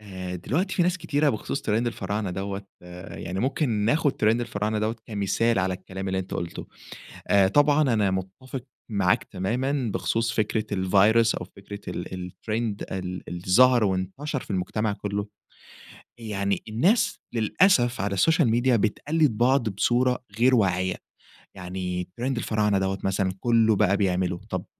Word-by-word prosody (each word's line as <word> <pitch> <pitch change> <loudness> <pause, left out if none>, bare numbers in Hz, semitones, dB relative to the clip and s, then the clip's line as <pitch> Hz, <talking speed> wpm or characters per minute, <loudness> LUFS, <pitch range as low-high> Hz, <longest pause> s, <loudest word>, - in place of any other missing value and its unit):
آآ، 95 -3 -6
دلوقتي 160 - -1
في 180 - +2
ناس 180 +1 +1
كتيرة 150 -2 +1
بخُصوص 130 +3 -2
trend - - -9
الفراعنة 105 -3 -1
دوّة، 95 +2 -4 0.2
آآ، 90 +2 -10
يعني 90 +2 -4
ممكن 135 +3 0
ناخُد 120 +7 +2
trend 110 +3 +2
الفراعنة 105 -2 -2
دوّة 110 +2 -1
كمثال 110 +1 0
على 95 -1 0
الكلام 95 +1 -6
اللي 95 0 -1
أنتَ 95 0 -5
قُلته. 85 - -5 0.6
آآ، 100 -1 +5
طبعًا 145 +7 +4
أنا 105 -3 +2
متَّفِق 95 +8 -5 0.3
معاك 95 -3 +2
تمامًا 120 +6 -2
بخُصوص 115 +1 0
فكرة 110 -1 0
الvirus 105 +5 +4
أو 90 - -5
فكرة 100 +1 -9
ال 90 0 -5
الtrend 110 0 -3
ال 90 -1 -4
اللي 90 0 -6
ظهَر 125 +4 +6
وانتشر 100 - -2
في - - -13
المجتمع 100 +3 -1
كله. 100 0 -3 0.9
يعني 100 -3 -2
الناس 170 - +2
للأسف 120 - +3
على 100 0 -1
السوشيال 155 - +3
ميديا 120 +2 +3
بتقلِّد 135 +5 +1
بعض 125 0 +3
بصورة 125 +5 +1 0.2
غير 130 +2 +5
واعِية، 95 -4 +1 0.6
يعني 90 -1 -4
trend 130 0 -1
الفراعنة 105 -3 +1
دوّة 95 0 -1
مثلًا 95 0 0
كله 115 -1 +3
بقى 100 -1 +3
بيعمله، 90 -2 0
طَب - - -3
105 Hz, 150 wpm, -25 LUFS, 95-120 Hz, 0.9 s, ظهَر